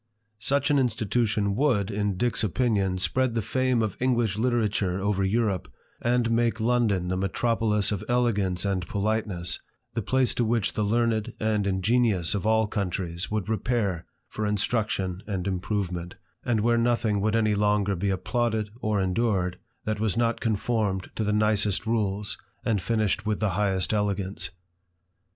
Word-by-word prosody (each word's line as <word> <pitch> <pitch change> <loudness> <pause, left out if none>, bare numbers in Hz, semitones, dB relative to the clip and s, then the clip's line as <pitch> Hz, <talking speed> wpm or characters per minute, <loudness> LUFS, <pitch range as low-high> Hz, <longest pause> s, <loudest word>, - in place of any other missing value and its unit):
Such 140 +5 +1
an 145 - +4
institution 110 -4 0
would, 115 -7 +1
in 100 -2 -1
Dick's 120 +1 +1
opinion, 100 -3 +1
spread 125 +6 +1
the 115 - +1
fame 130 +1 +1
of 105 -4 -2
English 120 -6 +1
literature 110 -5 0
over 100 0 0
Europe, 100 -1 0 0.3
and 120 -1 +1
make 115 0 +1
London 110 -6 +1
the 90 - -1
metropolis 105 +2 +1
of 100 - -2
elegance 105 -7 +1
and 95 -3 -1
politeness, 100 -4 -1 0.3
the 115 - -1
place 130 +4 +2
to 120 - 0
which 115 -3 0
the - - -1
learned 110 0 +1
and 105 -2 0
ingenious 100 -1 +2
of 105 0 -1
all 110 -1 +3
coimtries 90 -3 -3
would 105 -3 -2
repair 110 -5 -1 0.2
for 110 -1 -3
instruction 105 -3 -1
and 95 -4 -3
improvement, 90 -2 -2 0.3
and 115 -3 +1
where 120 +1 +3
nothing 115 -3 +1
would 110 +2 +1
any 110 -2 +2
longer 105 -1 +2
be 100 +3 -1
applauded 110 +2 -1
or 105 -2 0
endured 95 -2 0 0.3
that 110 -1 -1
was 110 -1 0
not 115 -1 +1
conformed 105 -3 -1
to 110 - -1
the 105 - 0
nicest 105 -1 +2
rules, 105 -3 -1 0.3
and 105 -4 +1
finished 110 -2 0
with 105 -1 0
the 110 - +1
highest 95 0 0
elegance. 100 -3 -1
105 Hz, 155 wpm, -26 LUFS, 95-115 Hz, 0.3 s, an